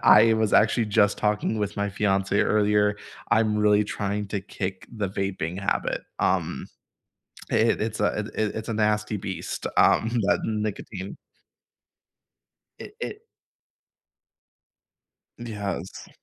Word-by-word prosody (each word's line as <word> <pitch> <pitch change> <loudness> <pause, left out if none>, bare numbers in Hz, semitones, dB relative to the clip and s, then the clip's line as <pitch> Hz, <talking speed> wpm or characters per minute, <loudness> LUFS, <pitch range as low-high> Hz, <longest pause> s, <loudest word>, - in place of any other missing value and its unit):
I 115 0 +7
was 110 -1 +1
actually 115 +1 +4
just 105 -1 +3
talking 105 +1 0
with 105 -1 -2
my 100 0 0
fiancée 100 0 +1
earlier, 105 -1 +2 0.3
I'm 105 0 +3
really 105 0 +4
trying 100 0 -3
to 100 -2 -2
kick 95 -1 -5
the 105 -4 -3
vaping 95 -2 -3
habit. 100 - -1 0.2
Um, - - 0 0.9
uh, - - +3
it 115 +1 +3
it's 110 0 -2
a 105 - +3
uh, 105 - -1
th 110 - -9
it 110 -1 -1
it's 110 - -5
a 115 - -1
nasty 105 0 +1
beast, 95 -3 -5
um, 115 - +4 0.2
that 100 - +2
nicotine. 105 -3 -4 1.6
It - - -10
it 425 -2 -5 2.1
Yes. 100 -5 -5
105 Hz, 130 wpm, -25 LUFS, 100-110 Hz, 2.1 s, I